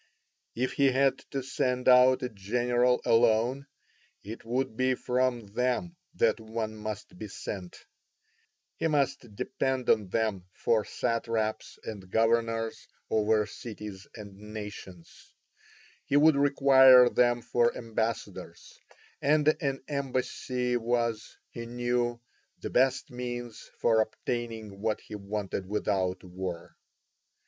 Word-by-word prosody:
If 130 +2 -1
he 140 - +3
had 135 +1 +2
to 135 -2 -3
send 125 -1 -1
out 130 0 +6
a 125 - -1
general 120 +4 +1
alone 120 +4 +3 0.6
it 110 +3 -8
would 125 +1 -2
be 130 +1 +2
from 125 -2 0
them 125 +9 -1 0.2
that - - +2
one 110 0 -4
must 105 -3 -7
be 110 - -5
sent: 95 -2 -7 0.9
he - - 0
must 135 -7 -1
depend 130 +3 0
on 105 -3 +2
them 100 -4 -1
for 110 -2 +1
satraps 115 -2 -2
and 100 -4 -8
governors 115 +1 0 0.2
over 110 0 +2
cities 105 -3 -9
and 100 -3 -10
nations; 105 -5 -10 0.7
he 140 - +2
would 155 +1 +6
require 135 -3 +7
them 120 -1 +2
for 120 -1 +1
ambassadors, 115 -1 -4 0.4
and 150 +1 +3
an 135 -2 -2
embassy 130 -3 -2
was, 115 -1 -2
he 115 0 -7
knew, 120 0 -1 0.4
the - - -6
best 130 +2 +2
means 120 -2 -6
for 115 -1 +3
obtaining 110 -3 -4
what 110 0 0
he - - -12
wanted 100 -2 -4
without 95 -3 -1
war. 90 -1 -6
120 Hz, 120 wpm, -29 LUFS, 110-125 Hz, 0.9 s, require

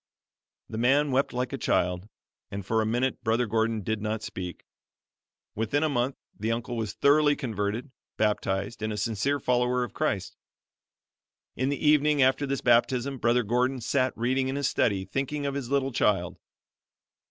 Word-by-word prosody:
The 110 - -5
man 140 +4 +3
wept 135 +2 +1
like 125 +1 -2
a - - -3
child, 90 +3 0 0.4
and 100 -1 -6
for 110 +3 +1
a 110 - 0
minute 120 +2 -1
Brother 115 +2 +2
Gordon 110 0 0
did 110 +2 -2
not 110 0 -2
speak. 90 -4 -6 0.9
Within 115 +8 0
a 155 - +2
month 130 -1 0 0.2
the 110 +2 -2
uncle 120 +1 -3
was 110 -3 -3
thoroughly 145 +3 +4
converted, 115 0 -3 0.3
baptized, 105 0 -1
and 110 0 -1
a 105 - -4
sincere 115 +7 0
follower 125 0 +1
of 120 - -6
Christ. - - -2 1.2
In 130 +2 0
the 140 - -1
evening 150 0 +4
after 135 +2 +3
this 140 0 -2
baptism, 125 +2 +2
Brother 120 +1 +2
Gordon 125 +4 +1
sat 130 +2 0
reading 130 +3 +1
in 135 - -2
his 140 -2 0
study, 95 -3 +1
thinking 140 +7 -3
of 140 - -1
his 135 -4 -4
little 135 -1 +1
child. 95 -7 0
120 Hz, 165 wpm, -27 LUFS, 110-135 Hz, 1.2 s, thoroughly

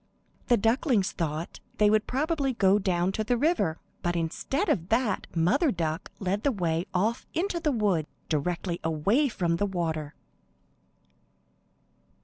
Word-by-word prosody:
The 240 - +5
ducklings 225 - +2
thought 160 0 -4 0.2
they 210 - +5
would 215 0 +2
probably 280 0 0
go 200 -2 +4
down 185 -2 +1
to 215 +2 -2
the 245 +3 +1
river, 230 - +1 0.2
but 175 0 -1
instead 220 - -1
of 170 +1 0
that 230 0 +1
Mother 245 - +3
Duck 165 -2 -3
led 195 +1 -1
the 280 - +2
way 170 -5 -1
off 220 +7 0
into 350 +1 0
the 310 -3 +1
wood, 200 - +1 0.2
directly 170 +3 -1
away 195 - +2
from 170 -6 0
the 205 - 0
water. 160 -5 -3
195 Hz, 140 wpm, -27 LUFS, 170-245 Hz, 0.2 s, The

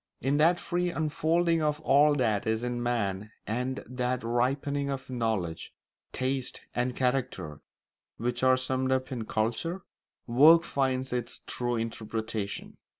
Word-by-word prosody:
In 135 +3 +1
that 165 +3 +4
free 175 0 -1
unfolding 165 +1 +1
of 150 -1 0
all 145 +1 +5
that 110 -6 +1
is 110 +1 0
in 120 0 -2
man 105 -4 -1
and 125 +4 -2
that 125 -1 -2
ripening 140 +4 0
of 135 -1 -5
knowledge, 110 -9 -2 0.4
taste, 130 0 -2
and 125 +1 -1
character, 125 - -1 0.6
which 120 +1 -2
are 130 0 +5
summed 130 0 -1
up 130 0 0
in 120 -4 -3
culture, 120 - -1 0.4
work 155 +8 +7
finds 130 -3 -1
its 120 -1 -3
true 120 -1 -1
interpretation. 110 -2 -4
125 Hz, 135 wpm, -29 LUFS, 115-140 Hz, 0.6 s, work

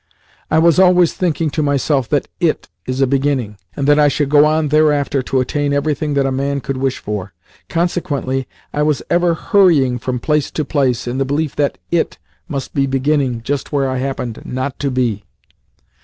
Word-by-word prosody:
I 160 - +2
was 165 +1 +4
always 180 -2 +5
thinking 165 -3 -1
to 155 - -1
myself 140 -2 +1
that - - 0
"IT - - 0 0.2
is 130 +1 +1
beginning," 130 -6 -1 0.2
and 140 - -2
that 145 0 +5
I 150 - +5
should 145 0 0
go 145 0 +6
on 155 0 +1
thereafter 145 -2 +2
to 130 +1 -1
attain 145 +3 -1
everything 145 0 -1
that 140 -1 +2
a 135 - 0
man 140 +1 -1
could 135 0 -4
wish 135 0 -1
for. 105 -3 -5 0.4
Consequently, 145 -6 -1 0.3
I 150 - 0
was 150 -1 +1
for - - -15
ever 175 0 +3
hurrying 155 -10 +3
from 125 +2 -2
place 150 +3 0
to 155 - -3
place, 130 -5 0
in 125 +2 -3
the - - +2
belief 145 +2 -1
that 145 -1 0
"IT" 170 -1 0 0.3
must 140 -5 -5
be 135 -1 +1
"beginning" 135 -3 0
just 140 +2 -3
where 140 -2 +1
I 130 -1 -2
happened 130 -3 -4
not 130 +2 -4
to 140 - -1
be. 120 -6 -1
140 Hz, 190 wpm, -17 LUFS, 130-150 Hz, 0.4 s, go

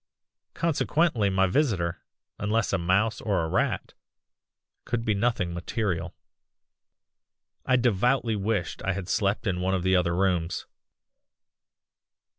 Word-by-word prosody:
Consequently 155 -7 +1
my 95 0 +3
visitor, 90 - 0 0.4
unless 105 0 0
a 95 - +2
mouse 95 +6 +1
or 100 -6 0
a - - -1
rat, - - -1 0.9
could 115 -1 -2
be 110 - +2
nothing 100 -5 0
material. 90 -1 -2 1.5
"I 130 - +4
devoutly 120 0 +2
wished 100 -2 -2
I 95 - 0
had 100 -2 -5
slept 100 +3 0
in 90 -3 -1
one 95 +1 +1
of 90 - -2
the 95 0 +3
other 85 -1 +2
rooms. 90 -2 0
100 Hz, 120 wpm, -27 LUFS, 90-115 Hz, 1.5 s, I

